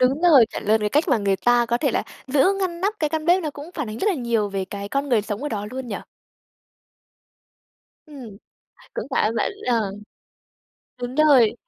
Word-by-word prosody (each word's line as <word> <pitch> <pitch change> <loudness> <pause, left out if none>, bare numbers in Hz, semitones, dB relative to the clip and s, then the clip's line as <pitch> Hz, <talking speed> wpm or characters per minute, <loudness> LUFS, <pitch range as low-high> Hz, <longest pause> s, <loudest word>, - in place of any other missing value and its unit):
đúng 265 +4 +2
rồi, 290 -10 +7
chuẩn - - -6
luôn, 220 +1 +3
cái 210 - 0
cách 295 +7 +1
mà 250 -5 +3
người 200 -1 +1
ta 240 +5 +3
có 235 +1 0
thể 280 -2 +1
là - - 0 0.2
giữ 270 +4 +3
ngăn 345 -2 -2
nắp 400 +3 0
cái 305 -2 0
căn 315 -1 -2
bếp 360 +1 +4
nó 305 - -2
cũng 290 +4 -10
phản 295 -8 -3
ánh 215 - -6
rất 420 - +1
là 390 - +2
nhiều 235 -6 0
về 195 -1 -3
cái 200 +1 -7
con 275 +3 -2
người 235 -5 +2
sống 210 +4 -5
ở 295 - -2
đó 205 -4 -4
luôn 260 0 -6
nhỉ? 205 - -3 2.1
Ừm, 255 -9 -11 0.6
cũng - - -4
cảm - - +2
ơn 225 - -4
bạn - - 0 0.2
ờ. 225 -5 +1 1.1
Đúng 245 +1 -4
rồi, 275 -7 +5
250 Hz, 215 wpm, -22 LUFS, 215-295 Hz, 2.1 s, rồi